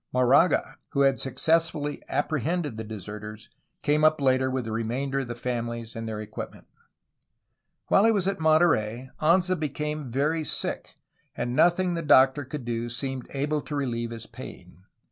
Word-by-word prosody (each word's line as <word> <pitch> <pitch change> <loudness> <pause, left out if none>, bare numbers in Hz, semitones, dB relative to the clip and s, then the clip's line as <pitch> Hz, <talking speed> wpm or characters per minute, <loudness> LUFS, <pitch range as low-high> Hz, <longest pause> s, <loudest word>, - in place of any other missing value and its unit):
Moraga, 125 +7 +3 0.2
who 140 - +2
had 135 -1 +3
successfully 150 +2 0
apprehended 155 -1 -1
the 110 - -5
de 110 0 -7
serters, 105 +2 -8 0.3
came 150 +1 +2
up 155 0 +5
later 130 -1 +2
with 130 -2 -2
the 110 - -4
remainder 125 +5 -1
of 135 - -3
the 120 - -5
families 115 -2 -4
and 115 0 -5
their 110 -1 -4
equipments 105 0 -8 1.1
While 200 - +4
he 225 - +6
was 200 -5 +1
at 195 -1 -1
Monterey, 130 -7 +2
Anza 180 +3 +3
became 150 -1 -3
very 150 +6 0
sick, - - -3 0.4
and 120 +1 -2
nothing 175 +3 +3
the 165 - -2
doctor 135 -1 +5
could 140 -1 -6
do 120 0 -2
seemed 130 +1 -4
able 145 +2 0
to 150 - -6
relieve 120 -4 -2
his 115 -1 -7
pain. 95 - -12
135 Hz, 165 wpm, -26 LUFS, 115-155 Hz, 1.1 s, he